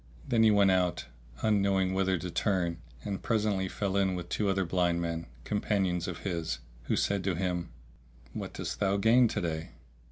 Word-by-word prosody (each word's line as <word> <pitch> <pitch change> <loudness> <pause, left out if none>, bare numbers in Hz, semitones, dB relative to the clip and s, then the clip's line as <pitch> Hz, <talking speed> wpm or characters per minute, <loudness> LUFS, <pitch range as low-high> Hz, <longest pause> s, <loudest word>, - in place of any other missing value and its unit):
Then 115 -2 +3
he 110 - +7
went 100 -2 +5
out, 90 -3 +1 0.4
unknowing 100 -3 +2
whither 95 -1 +2
to 90 +1 -5
turn, 85 -1 0 0.2
and 100 -2 -3
presently 105 -4 +1
fell 100 -2 -2
in 95 -2 +2
with 85 -1 -6
two 105 -2 0
other 95 -1 +1
blind 85 0 +1
men, 85 -1 -3 0.2
companions 95 - 0
of 90 - -5
his, 85 -8 -2 0.3
who - - +1
said 100 -2 0
to 95 -2 0
him, 90 -1 -2 0.6
"What - - -5
didst - - -4
thou 100 0 +2
gain 115 +4 +5
to 105 - -2
day?" 80 -2 -3
95 Hz, 180 wpm, -30 LUFS, 85-100 Hz, 0.6 s, he